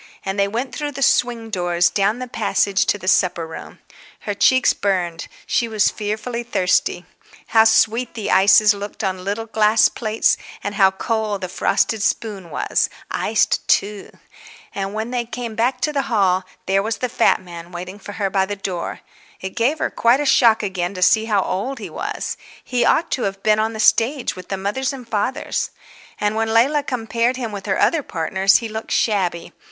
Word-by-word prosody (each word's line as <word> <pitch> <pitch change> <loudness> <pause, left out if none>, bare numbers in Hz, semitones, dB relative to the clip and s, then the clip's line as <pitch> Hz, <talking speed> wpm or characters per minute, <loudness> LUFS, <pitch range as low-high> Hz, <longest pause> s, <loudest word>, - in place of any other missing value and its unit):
And 195 +1 -2
they 200 - +3
went 240 +6 -4
through 295 -1 -4
the 275 +1 -2
swing 235 -3 +1
doors, 175 -2 +1
down 205 +3 +1
the 255 0 -6
passage, 200 -3 0
to - - +2
the 185 -2 -10
supper 180 -3 +2
room. 160 - -10 0.4
Her 205 - -3
cheeks 260 +5 +4
burned, 180 -4 -2 0.2
she 235 - 0
was 215 -2 +2
fearfully 215 +3 -4
thirsty. 190 -6 0 0.4
How 220 -1 +5
sweet 225 +2 +2
the 220 -3 -3
ices 205 +2 +6
looked 205 +2 -7
on 185 -2 -2
little 205 +4 -3
glass 220 0 +3
plates 220 -1 +1 0.3
and 205 - -3
how 195 -2 +5
cold 210 +1 -2
the 185 - -3
frosted 195 +4 0
spoon 200 -4 -2
was, - - 0 0.2
iced - - 0
too! 205 0 0 0.6
And 195 +1 -4
when 220 +2 -3
they 245 -1 -1
came 235 -1 -6
back 245 +3 0
to 300 - 0
the 280 - +1
hall 190 -5 +2 0.2
there 195 +1 +2
was 220 +2 -2
the 250 - -2
fat - - +2
man 175 -1 -11
waiting 180 +3 -7
for 205 - -9
her 200 -2 -2
by 190 -1 +1
the 205 - -3
door. 185 -3 -5 0.4
It 190 0 -7
gave 260 +7 +1
her - - -2
quite 235 +3 +3
a 295 - -1
shock 235 -5 +4
again 190 -1 -3
to 185 - 0
see 220 +4 +4
how 205 -4 +1
old 255 +9 -3
he 215 - -8
was; - - -4 0.3
he 250 -1 0
ought 335 - +2
to 255 - -1
have 195 0 -4
been 215 0 +3
on 220 +1 0
the 220 - -7
stage 240 +5 +2
with 185 -1 -10
the 195 - -2
fathers 230 +8 -2
and 255 -3 -9
mothers. 220 +5 -1 0.5
And 210 0 0
when 220 0 0
Leila 265 +7 +3
compared 240 -2 -1
him 235 -4 -4
with 200 -1 -7
her 190 - 0
other 330 - +3
partners 190 - +1
he 230 - +2
looked 220 0 -7
shabby. 185 -6 0
215 Hz, 195 wpm, -20 LUFS, 195-235 Hz, 0.6 s, ices